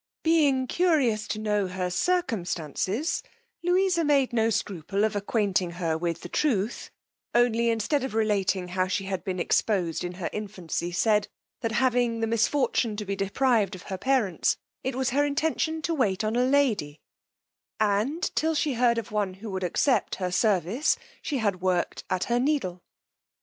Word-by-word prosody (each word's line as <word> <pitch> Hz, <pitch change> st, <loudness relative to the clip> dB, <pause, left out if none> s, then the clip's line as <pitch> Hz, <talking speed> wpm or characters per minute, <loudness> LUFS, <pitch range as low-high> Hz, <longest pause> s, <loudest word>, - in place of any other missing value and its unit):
Being 290 Hz, -5 st, +3 dB
curious 260 Hz, -11 st, +1 dB
to 215 Hz, -, -3 dB
know 210 Hz, -2 st, 0 dB
her 185 Hz, 0 st, -3 dB
circumstances, 215 Hz, -, -1 dB, 0.4 s
Louisa 355 Hz, 0 st, +2 dB
made 280 Hz, -4 st, +2 dB
no 225 Hz, -1 st, +2 dB
scruple 195 Hz, -2 st, -1 dB
of 220 Hz, -1 st, +1 dB
acquainting 200 Hz, -4 st, 0 dB
her 170 Hz, -2 st, -1 dB
with 170 Hz, 0 st, -2 dB
the -, -, -7 dB
truth, 230 Hz, -7 st, -1 dB, 0.5 s
only 235 Hz, -1 st, +3 dB
instead 230 Hz, +5 st, 0 dB
of 265 Hz, -5 st, -4 dB
relating 200 Hz, -4 st, +1 dB
how 185 Hz, +1 st, 0 dB
she 185 Hz, +1 st, -1 dB
had 190 Hz, -1 st, -3 dB
been 185 Hz, -2 st, -3 dB
exposed 175 Hz, -2 st, +1 dB
in 175 Hz, 0 st, -4 dB
her 180 Hz, -1 st, -4 dB
infancy, 185 Hz, -5 st, -4 dB
said, 210 Hz, +3 st, +2 dB, 0.3 s
that 225 Hz, -1 st, -2 dB
having 240 Hz, -1 st, +2 dB
the 225 Hz, -, +1 dB
misfortune 230 Hz, 0 st, +1 dB
to 210 Hz, -, -4 dB
be 200 Hz, 0 st, -2 dB
deprived 205 Hz, 0 st, +1 dB
of 180 Hz, -, -11 dB
her -, -, -2 dB
parents, 240 Hz, -, +1 dB, 0.3 s
it 260 Hz, 0 st, -2 dB
was 260 Hz, -1 st, 0 dB
her 285 Hz, +3 st, +3 dB
intention 315 Hz, +2 st, 0 dB
to 335 Hz, -, 0 dB
wait 215 Hz, -, +1 dB
on 215 Hz, +1 st, 0 dB
a 250 Hz, +1 st, +3 dB
lady, 245 Hz, -, +1 dB, 0.8 s
and 220 Hz, -, 0 dB
till 320 Hz, +1 st, +1 dB
she 295 Hz, -1 st, +1 dB
heard 235 Hz, -1 st, +3 dB
of 230 Hz, -1 st, -4 dB
one 205 Hz, -3 st, -1 dB
who 205 Hz, +2 st, -8 dB
would 190 Hz, 0 st, -3 dB
accept 250 Hz, +9 st, +1 dB
her 185 Hz, -2 st, -3 dB
service, 205 Hz, -, +2 dB, 0.2 s
she 290 Hz, -, -2 dB
had 200 Hz, -6 st, -1 dB
work'd 180 Hz, -2 st, 0 dB
at 185 Hz, -1 st, 0 dB
her 240 Hz, 0 st, +1 dB
needle. 250 Hz, -11 st, 0 dB
220 Hz, 165 wpm, -27 LUFS, 190-265 Hz, 0.8 s, Being